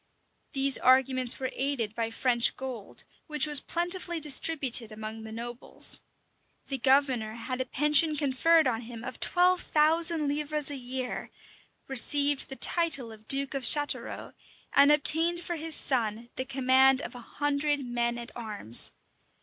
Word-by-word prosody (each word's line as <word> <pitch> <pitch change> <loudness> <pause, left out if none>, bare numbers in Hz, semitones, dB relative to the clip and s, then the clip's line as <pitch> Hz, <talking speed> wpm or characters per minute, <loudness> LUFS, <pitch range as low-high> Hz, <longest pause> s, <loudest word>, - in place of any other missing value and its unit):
These 275 -1 +2
arguments 255 -1 +2
were 260 -1 -4
aided 260 -6 -2
by 225 0 -3
French 235 +1 +2
gold, 255 -6 -8 0.2
which 300 -1 +1
was 295 -2 +5
plentifully 345 +1 0
distributed 275 -5 +2
among 215 +1 -8
the 220 0 -10
nobles. 235 +2 +1 0.6
The 270 -2 -4
governor 260 -4 +1
had 255 +2 -5
a - - -3
pension 300 +4 +3
conferred 305 +4 +2
on 235 -3 -1
him 230 -1 -10
of 255 0 -8
twelve 360 0 +2
thousand 320 0 +1
livres 295 0 -2
a - - -5
year, 255 -1 -6 0.6
received 285 +2 +2
the 270 - -6
title 305 -8 0
of 215 0 -16
duke 275 0 +1
of 275 - -4
Chatelrault, 290 +3 +1 0.4
and 280 +1 +5
obtained 325 +4 +3
for 345 0 -5
his 320 0 -1
son 235 -2 -3
the 260 - -4
command 265 0 +2
of - - -8
a 245 - -11
hundred 290 +2 -3
men 240 -1 -2
at 235 +1 -9
arms. 210 - -1
270 Hz, 150 wpm, -27 LUFS, 240-295 Hz, 0.6 s, was